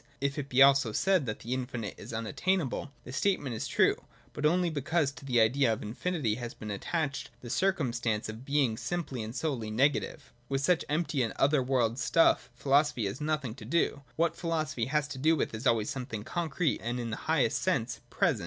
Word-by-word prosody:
If 140 +2 -1
it 140 -1 -5
be 135 +1 +7
also 135 -5 +5
said, 185 - +2
that 110 - -4
the 120 - -3
infinite 120 -5 -3
is - - -10
unattainable, 140 - -1
the 125 - -9
statement 145 -5 0
is - - -3
true, - - +3 0.4
but 150 - +1
only 175 +1 +2
because 150 0 0
to 140 - -13
the 125 -3 +2
idea 120 +3 +4
of 110 - -2
infinity 125 +2 -1
has 120 0 -5
been 105 -1 -6
attached 140 - -2
the 120 - -7
circumstance 120 - 0
of 110 +2 -7
being 135 -5 +1
simply 165 -8 -3
and 110 +2 -6
solely 130 -9 -2
negative. 135 +6 0 0.2
With 135 0 0
such 175 +3 +2
empty 150 -2 0
and 115 - -1
other 140 0 +3
world 125 -2 +1
stuff 140 0 +3
philosophy 135 -2 +2
has 100 +8 -4
nothing 150 -6 -1
to 130 - -11
do. 165 -4 +1
What 165 +1 +1
philosophy 155 -8 -1
has 150 +3 0
to 140 -2 -6
do 160 +4 +4
with 145 - -1
is 110 +5 -2
always 115 +3 +2
something 125 -6 -5
concrete 165 +1 -1
and 120 +2 -2
in 115 -2 -3
the 105 - -3
highest - - +2
sense - - 0
present. - - +1
135 Hz, 200 wpm, -30 LUFS, 115-155 Hz, 0.4 s, be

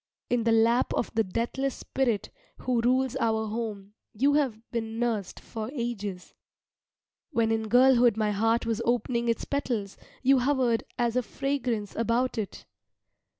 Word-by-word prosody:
In 240 -2 +1
the 230 - +4
lap 230 +2 +3
of - - -2
the 225 -1 +2
deathless 240 +7 -2
Spirit 230 -6 -1 0.3
who 250 -2 +1
rules 255 +1 +2
our 220 -1 +1
home 210 -3 -5 0.2
you 275 +6 +3
have 275 -7 +1
been 225 -1 -3
nursed 230 -5 -2
for 220 0 -6
ages. 210 -7 -4 1.0
When 230 -7 +1
in 220 -1 0
girlhood 245 -1 +5
my 215 -1 +1
heart 225 +3 +1
was 230 -1 -1
opening 235 0 0
its 230 - 0
petals, 240 -8 -2 0.3
you 270 0 +5
hovered 250 -3 +2
as 240 -1 0
a 250 - +3
fragrance 245 -5 -2
about 230 +2 0
it. 205 - -5
235 Hz, 150 wpm, -28 LUFS, 220-250 Hz, 1.0 s, girlhood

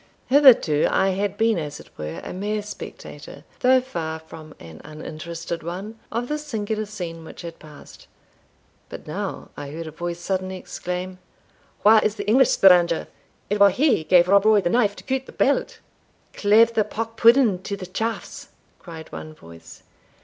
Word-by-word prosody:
Hitherto 255 - +6
I 190 0 +2
had 200 +1 -2
been 225 -3 +2
as 145 -2 -6
it - - -15
were 75 +2 -6
a - - -7
mere 205 +3 -3
spectator, 210 - -10 0.2
though 260 +1 +5
far 165 -11 -5
from 160 -1 -13
an 80 -1 -12
uninterested 165 +2 -7
one, 195 +7 -7
of 235 +2 -2
the 300 +2 -2
singular 215 -6 -4
scene 175 -5 -7
which 160 - -11
had 170 -1 -9
passed. 150 -2 -15 0.8
But - - -9
now - - -5
I 145 - -7
heard 165 +3 -7
a 155 - -7
voice 175 +2 -5
suddenly 185 +1 -3
exclaim, 180 0 -6 0.6
"Where 215 +1 +6
is 215 - 0
the 205 -1 -6
English 250 +4 +5
stranger? 175 -3 +4 0.4
It 205 +1 -1
was 200 -2 +6
he 280 - +2
gave 175 +2 +4
Rob 200 +2 +4
Roy 215 -1 +6
the 175 - -1
knife 210 -4 +2
to - - -12
cut 265 0 -3
the - - -10
belt." 480 -2 0 0.6
"Cleeve 220 +3 +4
the 220 - +2
pock 225 +2 -5
pudding 230 -5 +4
to 200 +1 -5
the 185 - -7
chafts!" 220 +5 -5 0.3
cried 165 -2 -11
one 155 0 -8
voice. 85 - -15
190 Hz, 170 wpm, -23 LUFS, 165-220 Hz, 0.8 s, Hitherto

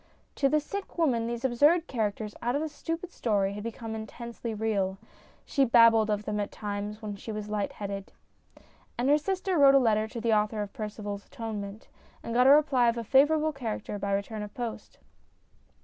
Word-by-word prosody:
To 275 - +2
the 305 - +3
sick 395 +7 -7
woman 245 -9 +2
these 235 +2 -3
absurd 295 +7 +4
characters 215 -5 -2
out 240 +2 0
of 290 - 0
a 315 - -3
stupid 330 +4 -5
story 200 -7 0
had 205 - -6
become 225 0 -6
intensely 230 +2 -6
real. 205 -3 -1 0.5
She 275 - +2
babbled 230 -3 +6
of 210 0 -1
them 210 0 -2
at 205 - -2
times 210 +1 -5
when 205 -1 -4
she 220 - -7
was 210 -1 -5
light 210 -1 -2
headed. 200 -1 -6 0.9
And 250 +3 +1
her 295 +1 +5
sister 375 +1 -1
wrote 275 -1 +7
a - - +7
letter 220 -3 +2
to 230 - -7
the 230 0 +1
author 210 0 +1
of 200 - -9
Percival 210 -1 -5
's - - -25
Atonement, 210 -2 -6 0.4
and 230 - -4
got 250 +2 +5
a - - +8
reply 280 -4 +5
of 235 - -1
a 235 - -3
favourable 300 +6 +3
character 220 -5 -4
by 200 0 -2
return 200 +2 -2
of 210 0 -6
post. 235 -3 -6
225 Hz, 195 wpm, -28 LUFS, 210-270 Hz, 0.9 s, a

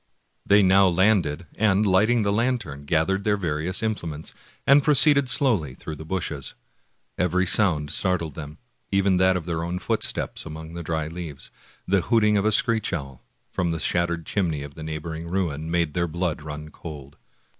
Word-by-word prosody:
They 100 0 +6
now 95 +1 +5
landed, 90 -3 +2
and 105 -1 +3
lighting 105 +4 +3
the 100 0 +1
lantern 105 - -1
gathered 85 +6 +1
their 105 0 +1
various 85 +2 -2
implements 85 -8 -4 0.3
and 140 +1 +6
proceeded 145 -2 +5
slowly 100 - +1
through 80 - -7
the 80 - -9
bushes. 80 -5 -4 0.6
Every 90 +1 +2
sound 80 -7 +2
startled 90 -5 0
them, 75 0 -8 0.3
even 100 -1 +2
that 95 0 +4
of 85 - -6
their 85 -1 -2
own 85 +2 -3
footsteps - - -2
among 80 +1 -8
the 85 - -5
dry 80 -1 -2
leaves, 80 -4 -8 0.3
and 95 - -4
the 95 - +5
hooting 105 -1 +3
of 100 0 +1
a 110 - +3
screech 110 +1 +2
owl, 70 -7 -5 0.3
from 90 -1 -1
the 80 -1 -2
shattered 85 0 0
chimney 80 -8 -1
of 70 -1 -9
the 80 - -11
neighboring 80 +1 -5
ruin, 85 -4 -2
made 85 -3 0
their 85 -1 0
blood 85 -1 -2
run 75 0 -7
cold. 75 -3 -10
85 Hz, 175 wpm, -24 LUFS, 80-100 Hz, 0.6 s, They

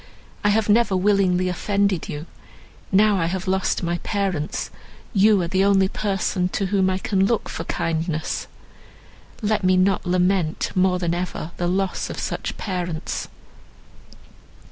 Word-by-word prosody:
I 205 - +3
have 215 +1 +2
never 210 -2 +3
willingly 185 -2 +2
offended 195 0 0
you; 150 +2 -5 0.7
now 205 +1 +4
I 165 -2 +1
have 185 +2 -3
lost 190 0 0
my 170 0 -1
parents, 195 -7 -2 0.4
you 205 0 +5
are - - -2
the 190 +2 +1
only 195 -1 +4
person 195 -2 -1
to 200 - 0
whom 190 -1 +2
I 185 - 0
can 195 0 +1
look 235 0 0
for 165 - -5
kindness. 160 -1 -2 1.0
Let 210 -1 +1
me 185 0 +4
not 185 0 +2
lament 180 -2 +1
more 185 0 +2
than 175 -2 -1
ever 175 -2 -4
the 175 - -1
loss 190 +1 -1
of - - -6
such - - -4
parents." 175 -5 -3
190 Hz, 145 wpm, -23 LUFS, 175-200 Hz, 1.0 s, you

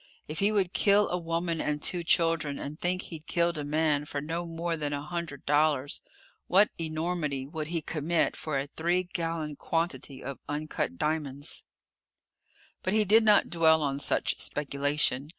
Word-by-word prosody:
If 155 +1 -5
he 200 +2 +3
would 195 -4 +1
kill 205 0 +4
a 180 - 0
woman 165 0 -1
and 150 0 -1
two 175 +3 0
children 165 -4 +2
and 145 +2 -6
think 180 +3 -1
he'd 160 -2 -8
killed 170 -1 +2
a - - -3
man 150 0 +1
for 145 - -4
no 165 +4 -3
more 165 0 -2
than 150 -2 -2
a 145 - -2
hundred 165 -3 -5
dollars, 145 -2 +2 0.5
what 200 +3 +5
enormity 155 -4 -2
would 155 +1 -5
he 165 -1 -2
commit 160 +2 +1
for 155 -3 -3
a 135 - -1
three 170 +5 0
gallon 165 -4 -3
quantity 165 -5 -2
of 135 -1 -6
uncut 150 - -2
diamonds? 145 - -2 1.2
But 185 - -1
he 215 -1 +4
did 215 +4 +6
not 210 -2 +4
dwell 160 -2 +4
on 140 -1 -1
such - - +1
speculation. 145 -1 0
160 Hz, 170 wpm, -29 LUFS, 145-170 Hz, 1.2 s, did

